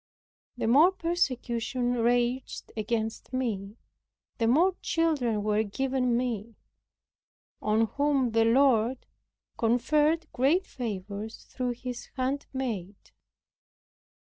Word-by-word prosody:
The - - -2
more 290 +11 +6
persecution 255 -8 -1
raged 245 +1 0
against 220 +2 -3
me 215 -5 -2 0.6
the 225 - +2
more 335 +11 +4
children 270 -11 +1
were 210 0 +2
given 250 +3 0
me, 230 -3 -3 1.1
on 215 +1 +2
whom 275 0 +1
the 225 0 +3
Lord 245 0 +3 0.5
conferred 300 +8 +2
great 305 +9 +2
favors 210 -1 -6
through 250 -2 -3
His 250 0 -7
handmaid. 255 -7 -3
245 Hz, 90 wpm, -28 LUFS, 225-270 Hz, 1.1 s, more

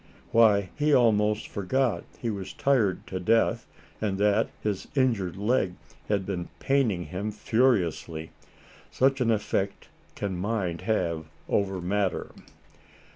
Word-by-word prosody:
Why, 105 -4 +5
he 150 0 +3
almost 105 -3 +3
forgot 120 +5 0
he 115 - -2
was 95 -2 -6
tired 115 -9 +1
to 95 - -4
death, 115 +5 +2 0.3
and 100 -3 0
that 105 0 +2
his 105 -3 -3
injured 115 -10 +1
leg 100 -3 +1 0.3
had 100 -2 +1
been 90 -3 -4
paining 120 -10 +1
him 95 +7 -4
furiously. 100 -9 0 0.6
Such 135 +1 +2
an 120 - +2
affect 100 -2 -1 0.3
can 100 -2 -3
mind 90 -3 -2
have 85 -6 -1 0.2
over 95 -2 0
matter. 95 +2 -1
105 Hz, 125 wpm, -27 LUFS, 95-115 Hz, 0.6 s, Why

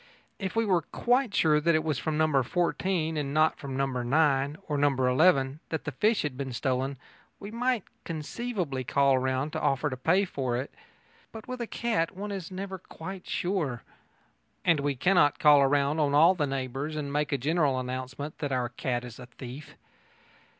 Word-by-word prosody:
If 190 -1 -4
we 225 0 +2
were 185 -4 +3
quite 245 - 0
sure 155 -4 +4
that 170 +1 +3
it 155 - +1
was 155 -4 -1
from 155 -1 -2
No. 155 -3 +3
14, 170 +2 0
and 145 -1 -2
not 155 0 +3
from 135 -2 -5
No. 135 - +2
9 135 +3 +1
or 150 - -1
No. 145 0 +3
11, 135 +2 +3
that 160 - -3
the 145 - -4
fish 210 - +1
had 150 -4 -3
been 135 -1 -4
stolen, 130 +2 -1 0.4
we 200 +1 -8
might 245 -2 0 0.2
conceivably 165 - -3
call 135 +1 +3
round 130 +3 -1
and 160 - -3
offer 140 +2 +1
to - - -2
pay 180 +10 +2
for 130 -8 -2
it. 130 +3 -5 0.6
But 220 -1 -10
with 255 -1 -5
a 235 - -3
cat 220 -11 -1
one 205 +1 -4
is 190 -4 -5
never 190 0 -6
quite 185 +2 -9
sure. 165 -10 -2 0.8
And 165 -4 +4
we 140 0 0
cannot 150 0 +3
call 145 -2 +6
round 145 +2 +1
on 145 -1 +2
all 165 +5 +7
the 155 -6 -1
neighbours 135 +3 -3
and 145 -2 -4
make 150 +1 0
a 140 - +2
general 145 0 +1
announcement 130 +3 -5
that 145 -2 -3
our 125 -2 0
cat 120 0 -2
is 120 0 -10
a 125 - -9
thief. 125 +3 -10
150 Hz, 190 wpm, -28 LUFS, 135-175 Hz, 0.8 s, all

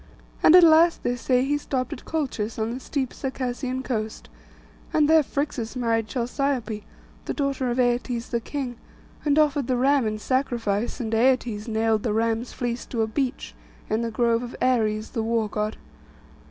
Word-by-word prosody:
And 320 - +7
at 360 - +9
last, 330 +1 +5
they 245 - 0
say, 250 +1 +1
he 290 +1 0
stopped 255 -3 -2
at - - -10
Colchis, 255 -9 -2
on 220 0 -1
the 250 - -4
steep 265 -2 -3
Circassian 260 -1 -3
coast; 220 -4 -4 0.6
and 300 -1 +3
there 320 0 +6
Phrixus 280 -5 -3
married 230 -3 0
Chalciope, 240 -1 -2 0.4
the - - -2
daughter 275 -3 -1
of 240 - -1
Aietes 245 -1 0
the 235 - +1
king; 255 -1 -4 0.5
and 290 -1 +2
offered 290 -4 +3
the 255 - +1
ram 270 -1 +3
in 215 0 -2
sacrifice; 235 -2 -1
and 225 -3 -3
Aietes 235 -2 +2
nailed 220 -1 +1
the 215 -2 -1
ram's 225 +2 0
fleece 240 -1 -3
to 230 -3 -1
a - - -1
beech, 260 +3 -3 0.4
in 220 +2 +1
the 230 - -1
grove 230 +1 +1
of 245 0 -7
Ares 220 -4 +1
the 230 - -2
war 225 -1 0
God. 210 +1 -3
245 Hz, 175 wpm, -25 LUFS, 225-270 Hz, 0.6 s, at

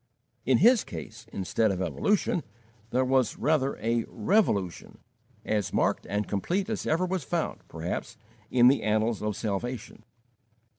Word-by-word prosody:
In 130 -2 +5
his 235 - +5
case, 110 +1 -9
instead 105 +3 0
of 95 -2 -1
evolution, 180 - +1 0.5
there 130 +2 +1
was 130 -3 +2
rather 140 -1 +1
a 115 +1 0
revolution, 105 - 0 0.5
as 105 -3 0
marked - - 0
and 105 +1 -1
complete 185 - -1
as 220 - -3
ever 165 +4 +2
was 185 -3 -2
found, - - -2
perhaps, 80 +2 -5 0.3
in 120 -1 +5
the 135 +2 +4
annals 110 +1 +1
of 105 -1 -1
salvation. 110 +2 -4
120 Hz, 140 wpm, -28 LUFS, 105-155 Hz, 0.5 s, In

